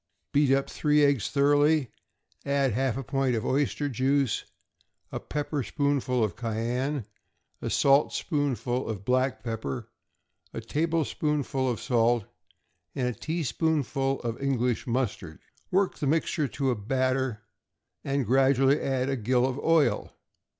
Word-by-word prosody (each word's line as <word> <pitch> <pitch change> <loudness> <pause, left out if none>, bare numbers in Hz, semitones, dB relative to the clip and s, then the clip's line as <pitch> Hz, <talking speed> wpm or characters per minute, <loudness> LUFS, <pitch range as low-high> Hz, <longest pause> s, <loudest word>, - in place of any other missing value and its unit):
Beat 145 -1 +4
up 135 0 +2
three 150 -1 +3
eggs 140 -6 +1
thoroughly; 145 -1 +3 0.5
add 140 -2 +1
half 130 0 0
a 135 - -3
pint 135 -2 0
of 110 - -2
oyster 145 +1 0
juice, 135 -1 +1 0.7
a - - -3
pepper 150 -1 -3
spoonful 135 -3 0
of 100 -6 -1
cayenne, 120 +3 -2 0.6
a - - -3
saltspoonful 135 - +1
of 100 -3 -5
black 130 +2 +1
pepper, 110 - -4 0.7
a - - -2
tablespoonful 150 0 -1
of 120 - -2
salt, 120 -3 +2 0.7
and 125 -3 0
a - - -3
teaspoonful 145 -3 -1
of 115 +1 -4
English 125 -2 0
mustard. 110 -9 -2 0.3
Work 190 +1 +1
the 145 - -1
mixture 155 0 +1
to 135 0 -1
a - - 0
batter, 130 +1 -1 0.6
and 140 -1 -1
gradually 135 +3 +3
add 130 -1 0
a 135 - 0
gill 125 +1 +1
of 130 +1 -2
oil. 165 -2 +1
135 Hz, 130 wpm, -27 LUFS, 120-145 Hz, 0.7 s, Beat